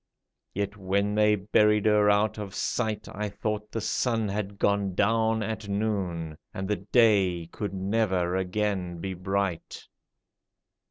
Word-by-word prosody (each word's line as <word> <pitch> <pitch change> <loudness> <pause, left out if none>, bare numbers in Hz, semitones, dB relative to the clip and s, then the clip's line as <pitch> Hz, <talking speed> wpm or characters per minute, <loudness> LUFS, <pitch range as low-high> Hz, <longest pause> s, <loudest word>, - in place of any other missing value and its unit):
Yet 100 +1 -2
when 100 +1 0
they 105 0 +4
buried 105 +1 +3
her 105 -1 +4
out 105 +1 +2
of 105 - -4
my 95 - -15
sight 110 -2 -2
I 105 0 -3
thought 105 +1 -4
the 115 - -3
sun 115 0 0
had 100 0 -3
gone 100 -2 +1
down 110 +2 +2
at 110 -1 -4
noon. 95 -7 -2 0.2
And 95 0 -3
the 105 - 0
day 95 -4 +3
could 105 -2 -4
never 95 -3 0
again 95 -1 -1
be 95 +2 -4
bright. 95 -1 -3
100 Hz, 145 wpm, -27 LUFS, 95-105 Hz, 0.2 s, they